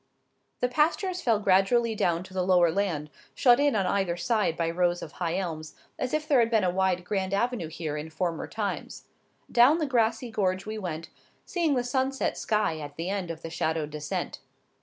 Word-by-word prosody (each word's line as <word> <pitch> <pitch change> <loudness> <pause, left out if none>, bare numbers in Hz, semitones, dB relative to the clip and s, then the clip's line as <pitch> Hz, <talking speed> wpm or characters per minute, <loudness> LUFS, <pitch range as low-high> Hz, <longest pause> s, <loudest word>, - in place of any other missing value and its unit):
The 250 - +3
pastures 340 +8 +1
fell 230 -8 +3
gradually 210 +4 +3
down 175 -4 0
to 185 - -14
the 185 - 0
lower 180 -2 +4
land, 160 -6 -1 0.2
shut 245 0 +5
in 285 -3 +3
on 195 -3 +1
either 180 -2 0
side 210 -3 0
by 165 - 0
rows 175 0 +1
of 155 - -8
high 170 +1 -2
elms, 160 -5 -4 0.2
as 255 - -2
if 305 0 -1
there 275 -4 +4
had 230 -1 +3
been 220 -3 +2
a 180 - +2
wide 185 -1 +1
grand 190 0 -1
avenue 235 -4 -1
here 155 -1 -4
in 150 +2 -5
former 165 +1 -2
times. 210 -2 -4 0.5
Down 250 +6 +6
the 320 - 0
grassy 235 -2 +1
gorge 190 -3 0
we 215 0 -4
went, 165 -4 -5 0.4
seeing 330 -5 0
the 245 - +1
sunset 260 +2 0
sky 210 -7 0
at 145 -1 -8
the 165 +4 -4
end 195 -4 -3
of 165 0 -6
the 165 - -6
shadowed 160 -2 -1
descent. 150 0 -4
190 Hz, 200 wpm, -27 LUFS, 170-240 Hz, 0.5 s, Down